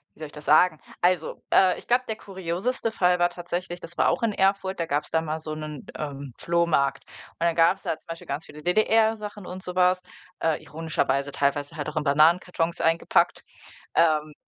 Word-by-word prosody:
wie - - -24
soll 155 - -5
ich 150 - -11
das 150 0 -11
sagen? 155 +1 +4 0.2
Also, 175 -2 +1
äh, 185 -1 +5
ich - - -12
glaube, 245 +1 +3
der 220 - -2
kurioseste 195 +5 -3
Fall 180 -4 +2
war 175 0 +4
tatsächlich, 175 0 -5
das 170 0 -11
war - - +4
auch - - 0
in 225 -2 +1
Erfurt, 195 -1 +1
da 170 - 0
gab's 145 0 -1
da 160 - +2
mal 160 0 -3
so 155 -1 -5
'nen, 155 -2 -7
ähm, 140 -3 -6
Flohmarkt, 160 -5 +1 0.3
und - - -32
dann 170 -1 +2
gab's 170 +4 +3
da 160 - -2
zum - - -31
Beispiel 165 0 -8
ganz 140 +3 -4
viele 150 - -12
DDR-Sachen 215 +1 +1
und 185 +1 -7
so 180 -1 -5
was, 180 0 +3 0.4
äh, 160 -2 +1
ironischerweise 145 -3 -1
teilweise 145 +3 -1
halt 150 - -4
auch - - -10
in 155 - 0
Bananenkartons 165 +3 +2
eingepackt. 165 +1 +2 0.5
Ähm. 155 -2 +3
170 Hz, 200 wpm, -25 LUFS, 155-185 Hz, 0.5 s, äh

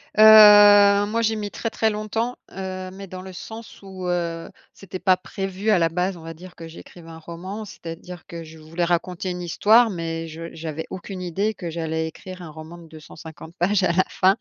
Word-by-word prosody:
Heu, 205 -1 +8
moi, 230 +2 -1
j'ai 220 0 +1
mis 205 -1 -5
très, 230 - -4
très 220 0 0
longtemps. 220 +3 -3 0.2
Heu, 185 0 -6
mais 195 0 -9
dans 185 0 -8
le 190 0 -10
sens 225 +4 -10
où, 190 -2 -9
heu, 170 -1 -3 0.2
c'était 185 -1 -9
pas 185 -1 +3
prévu 195 +3 -4
à 200 -4 +4
la 165 0 +2
base 180 +2 -2
on - - -12
va 165 0 -7
dire 180 +2 -13
que 165 -1 -10
j'écrive 165 +1 -13
un 165 0 -10
roman. 185 +6 -8
C'est-à-dire 175 -1 -10
que 170 -1 -8
je 160 0 -13
voulais 165 +3 -4
raconter 180 +1 -2
une 180 0 -5
histoire 220 +7 +4
mais 165 -2 -4
je 165 +1 -8
j'avais 160 -1 -6
aucune 185 0 -7
idée 195 +5 -1
que 175 -4 -7
j'allais 160 -1 -3
écrire 185 +3 -10
un 165 - -9
roman 160 +2 -11
de 170 -1 -14
250 160 +1 -12
pages 195 +2 +1
à 175 - +3
la 185 +2 +3
fin. 190 +2 +3
180 Hz, 210 wpm, -23 LUFS, 165-200 Hz, 0.2 s, Heu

